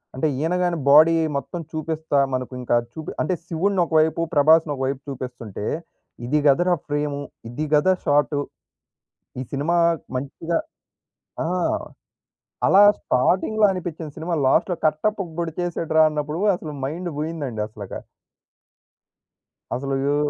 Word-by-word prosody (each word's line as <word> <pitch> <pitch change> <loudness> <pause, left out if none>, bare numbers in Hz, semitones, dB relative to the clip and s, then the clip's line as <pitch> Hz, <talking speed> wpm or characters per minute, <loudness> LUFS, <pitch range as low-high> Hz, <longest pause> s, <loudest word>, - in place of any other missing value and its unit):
అంటే 130 +4 +1
ఈయన 160 +5 0
గానీ 175 -1 +1
బాడీ 155 +4 +7 0.2
మొత్తం 165 +5 -5
చూపిస్తా 155 -2 -2 0.2
మనకు 130 0 -3
ఇంకా 120 - +1 0.2
చూపి 160 -1 -6
అంటే 170 - 0
శివుడ్ని 180 +3 0
ఒకవైపు 160 0 +2
'ప్రభాస్‌ని' 155 +1 +5
ఒకవైపు 135 0 -2
చూపిస్తుంటే, 125 -6 -6 0.6
ఇది 150 +5 +1
గదరా! 175 +6 +4
ఫ్రేము, 145 -1 -1 0.3
ఇది 150 +6 -3
గదా! 150 +6 +5
షాటు. 145 0 +2 1.0
ఈ - - -2
సినిమా 145 +5 0 0.4
మంచిగా 140 +6 -2 0.9
ఆ! - - -1 1.2
అలా 195 - +7 0.2
స్టార్టింగ్‌లో 190 +11 +2
అనిపిచ్చిన 170 -3 -5
సినిమా, 170 +2 -2
లాస్ట్‌లో 175 +6 +2
కట్టప్ప 195 +6 0
పొడిచేసాడు‌రా 165 -1 +1
అన్నప్పుడు 150 +2 -3 0.2
అసలు 155 -4 -7
మైండ్ 170 +6 -3
బోయిందండి 150 -8 -3
అసల‌కా. 105 -3 -8 1.8
అసలు 135 +2 -2
యో 145 - +2
155 Hz, 115 wpm, -23 LUFS, 140-170 Hz, 1.8 s, బాడీ